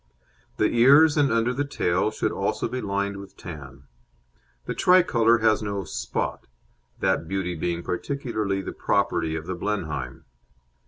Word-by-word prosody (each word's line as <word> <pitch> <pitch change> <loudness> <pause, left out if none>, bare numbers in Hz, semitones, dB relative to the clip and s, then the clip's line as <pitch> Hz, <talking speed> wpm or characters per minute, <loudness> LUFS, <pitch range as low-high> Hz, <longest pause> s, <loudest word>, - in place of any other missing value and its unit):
The - - +2
ears 140 +6 +6
and 145 -4 +3
under 115 +2 +1
the 140 +3 -1
tail 95 -8 0
should 110 - -2
also - - -1
be 130 - -4
lined 100 0 -2
with 100 -1 -11
tan. 75 -7 -10 0.8
The - - -3
Tricolour 120 -11 +4
has 110 -1 +3
no 100 -2 -3
"spot," - - -4 0.5
that 80 - +1
beauty 95 -1 -2
being 85 +1 -3
peculiarly 110 -3 -2
the - - -5
property 80 -1 0
of 80 -1 -5
the 95 - -3
Blenheim. 90 -4 -4
100 Hz, 145 wpm, -25 LUFS, 90-120 Hz, 0.8 s, ears